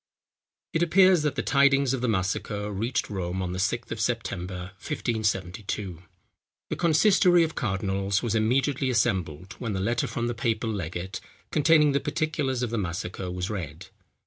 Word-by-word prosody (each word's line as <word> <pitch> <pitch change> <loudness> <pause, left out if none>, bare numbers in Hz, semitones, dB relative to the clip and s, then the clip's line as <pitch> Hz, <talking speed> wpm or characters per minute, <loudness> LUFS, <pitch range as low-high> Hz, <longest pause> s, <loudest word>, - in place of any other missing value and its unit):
It 160 - +1
appears 185 0 +5
that 150 -2 0
the 135 - -1
tidings 140 -1 +4
of 130 - -2
the 125 - 0
massacre 105 +1 -1
reached 115 +4 -1
Rome 95 -2 -3
on 90 -1 -2
the 90 - -4
6th 115 +5 -1
of 115 - -4
September, 95 -6 -3
1572. 100 - -2 0.7
The - - 0
consistory 175 +1 +4
of 160 0 -2
cardinals 95 -1 -1
was 115 - 0
immediately 130 +4 +1
assembled, 95 -6 0
when 115 -4 -3
the 95 - -2
letter 115 +5 0
from 120 - -3
the 120 - -1
papal 115 0 -1
legate, 90 -1 -4 0.3
containing 150 -1 +5
the 140 - +2
particulars 145 -3 -1
of 120 - -2
the 115 - 0
massacre, 90 0 -4
was 90 +2 -3
read. 90 -2 -6
110 Hz, 160 wpm, -26 LUFS, 95-135 Hz, 0.7 s, appears